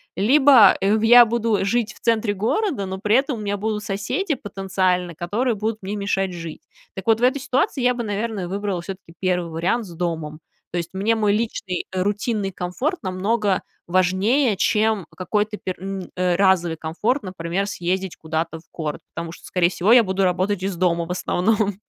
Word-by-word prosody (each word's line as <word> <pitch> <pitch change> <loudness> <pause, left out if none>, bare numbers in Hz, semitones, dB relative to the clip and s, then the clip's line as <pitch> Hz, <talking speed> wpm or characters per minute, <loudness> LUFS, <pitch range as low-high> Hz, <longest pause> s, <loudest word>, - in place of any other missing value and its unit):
Либо, 265 +4 +6
э, 195 +1 +2
ух 220 0 +1
я 240 +1 +9
буду 225 -3 0
жить 215 0 0
в - - -18
центре 225 -2 +1
города, 230 - 0
но 190 0 -5
при 210 +2 +2
этом 265 -2 +1
у - - -6
меня 205 -1 -2
будут 210 +1 -2
соседи 210 - -2
потенциально, 185 -5 -1
которые 220 +9 -1
будут 215 +1 -2
мне 195 +2 -4
мешать 195 -2 -1
жить. 165 -2 -7 0.3
Так 190 +1 -7
вот, 225 0 +3
в - - -1
этой 260 +3 +3
ситуации 265 0 0
я 250 0 +3
бы, 240 - -3
наверное, 210 -2 -3
выбрала 195 -1 -3
все-таки 185 -2 -9
1 180 -2 0
вариант 180 +9 -1
с 175 - -10
домом. 160 -3 -3 0.3
То 175 - -3
есть, 170 -1 -3
мне 200 +4 +1
мой 215 -2 +2
личный, 210 -4 -2
э, 185 -1 -1
рутинный 205 +1 -1
комфорт 180 - -3
намного 195 +2 0 0.3
важнее, 190 +7 +2
чем 215 -1 +1
какой-то 210 +3 -1
пер 185 - -3
м, 195 -1 -5
э, 180 -1 +1
разовый 175 -3 +2
комфорт, 210 - -1
например, 185 +1 -3
съездить 185 -1 -2
куда-то 160 +1 -3
в - - -20
город, 155 -3 -4
потому 165 -1 -5
что, - - -13
скорее 175 -2 +2
всего, 190 +5 +3
я 245 -1 +7
буду 190 -1 0
работать 185 +1 0
из 195 -1 -2
дома 170 -1 +1
в 170 - -6
основном. 200 +2 0
195 Hz, 190 wpm, -22 LUFS, 180-220 Hz, 0.3 s, я